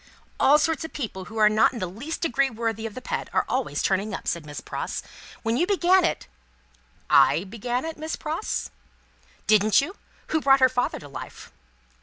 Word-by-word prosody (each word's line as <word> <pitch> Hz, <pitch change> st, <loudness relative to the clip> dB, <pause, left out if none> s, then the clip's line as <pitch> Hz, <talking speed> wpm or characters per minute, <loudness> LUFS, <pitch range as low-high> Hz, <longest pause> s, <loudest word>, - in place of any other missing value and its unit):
"All 290 Hz, +2 st, +6 dB
sorts 320 Hz, +1 st, 0 dB
of 320 Hz, -, -7 dB
people 205 Hz, -9 st, -5 dB
who 220 Hz, +4 st, -9 dB
are 215 Hz, -1 st, +6 dB
not 215 Hz, +4 st, +4 dB
in -, -, -6 dB
the 195 Hz, -, -2 dB
least 230 Hz, -, -6 dB
degree 275 Hz, -3 st, +1 dB
worthy 225 Hz, -2 st, -3 dB
of 215 Hz, -, -11 dB
the 255 Hz, -, -8 dB
pet, -, -, -3 dB
are -, -, +2 dB
always -, -, -1 dB
turning 195 Hz, +2 st, 0 dB
up," -, -, -8 dB
said 165 Hz, -3 st, -2 dB
Miss 145 Hz, -, -6 dB
Pross. -, -, -5 dB, 0.4 s
"When 225 Hz, +1 st, 0 dB
you 350 Hz, -, +2 dB
began 375 Hz, -2 st, +4 dB
it 335 Hz, -, 0 dB, 0.5 s
" -, -, -35 dB, 0.2 s
"I 165 Hz, -, 0 dB
began 240 Hz, +6 st, -3 dB
it, 325 Hz, -1 st, -6 dB
Miss 315 Hz, +1 st, -3 dB
Pross?" 320 Hz, +6 st, -3 dB, 0.7 s
"Didn't 215 Hz, -1 st, +5 dB
you? 325 Hz, +8 st, -2 dB, 0.3 s
Who 315 Hz, -, +1 dB
brought 270 Hz, -1 st, +5 dB
her 260 Hz, -1 st, +6 dB
father 250 Hz, 0 st, -1 dB
to 145 Hz, -, -10 dB
life?" 140 Hz, -, -9 dB
240 Hz, 200 wpm, -25 LUFS, 210-310 Hz, 0.7 s, All